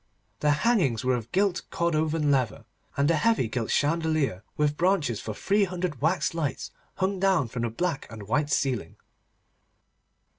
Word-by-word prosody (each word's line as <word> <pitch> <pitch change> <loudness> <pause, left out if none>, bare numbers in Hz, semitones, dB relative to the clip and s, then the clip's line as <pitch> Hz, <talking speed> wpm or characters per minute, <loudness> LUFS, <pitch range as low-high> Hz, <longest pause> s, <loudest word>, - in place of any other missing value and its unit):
The 150 - +2 0.2
hangings 175 - +2
were 130 - +3
of 120 -1 -6
gilt 195 -1 +1
Cordovan 160 -4 +1
leather, 130 -6 0 0.3
and 140 +3 +3
a - - +3
heavy 225 - +2
gilt 115 0 -3
chandelier 155 - +1
with 150 0 +1
branches 165 - +1
for 110 - -5
three 200 - +2
hundred 180 -6 -4
wax 160 +1 +1
lights 155 -4 -3 0.2
hung 190 0 -1
down 185 -10 +2
from 120 +1 -4
the 120 - 0
black 150 +5 -2
and 110 -2 -8
white 145 +9 0
ceiling. 125 - -1
150 Hz, 155 wpm, -27 LUFS, 125-180 Hz, 0.3 s, were